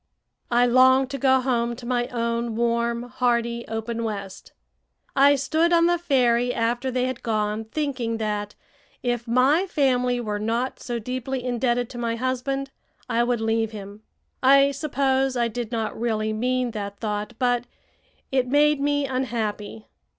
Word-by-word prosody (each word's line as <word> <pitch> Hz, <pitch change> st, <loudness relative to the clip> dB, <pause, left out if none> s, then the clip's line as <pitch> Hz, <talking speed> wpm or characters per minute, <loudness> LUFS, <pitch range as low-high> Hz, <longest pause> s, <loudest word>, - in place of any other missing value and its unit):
I 240 Hz, 0 st, +4 dB
longed 260 Hz, +2 st, +5 dB
to 275 Hz, -, -4 dB
go 265 Hz, 0 st, +4 dB
home 240 Hz, -2 st, 0 dB
to 240 Hz, -, -11 dB
my 240 Hz, 0 st, 0 dB
own 235 Hz, -1 st, -2 dB
warm, 235 Hz, 0 st, 0 dB
hearty, 235 Hz, -1 st, -1 dB
open 225 Hz, +1 st, -3 dB
West. 200 Hz, -3 st, -6 dB, 0.6 s
I 280 Hz, +1 st, +6 dB
stood 315 Hz, +5 st, +1 dB
on 335 Hz, -1 st, +5 dB
the 345 Hz, 0 st, +2 dB
ferry 245 Hz, -6 st, +2 dB
after 240 Hz, +3 st, -1 dB
they 250 Hz, 0 st, 0 dB
had 255 Hz, -1 st, -4 dB
gone, 215 Hz, -1 st, -1 dB
thinking 250 Hz, -3 st, -2 dB
that, 210 Hz, -1 st, -3 dB, 0.5 s
if 240 Hz, -1 st, -1 dB
my 270 Hz, +10 st, +3 dB
family 250 Hz, -6 st, +1 dB
were 210 Hz, -3 st, -3 dB
not 230 Hz, +4 st, -2 dB
so 240 Hz, -1 st, -4 dB
deeply 250 Hz, +2 st, -4 dB
indebted 245 Hz, -1 st, 0 dB
to 240 Hz, -, -7 dB
my 230 Hz, -1 st, -1 dB
husband, 260 Hz, +2 st, -2 dB, 0.4 s
I 235 Hz, -1 st, +1 dB
would 240 Hz, -1 st, 0 dB
leave 225 Hz, 0 st, 0 dB
him. 205 Hz, 0 st, -9 dB, 0.4 s
I 275 Hz, +1 st, +6 dB
suppose 270 Hz, -2 st, 0 dB
I 235 Hz, -1 st, +2 dB
did 230 Hz, 0 st, -5 dB
not 225 Hz, -2 st, -2 dB
really 220 Hz, -2 st, 0 dB
mean 250 Hz, +2 st, 0 dB
that 200 Hz, -2 st, -5 dB
thought, 210 Hz, +1 st, -3 dB
but 245 Hz, -1 st, +1 dB, 0.7 s
it 260 Hz, -2 st, +1 dB
made 295 Hz, +2 st, +3 dB
me 285 Hz, 0 st, +1 dB
unhappy. 225 Hz, -5 st, -3 dB
245 Hz, 155 wpm, -24 LUFS, 230-260 Hz, 0.7 s, I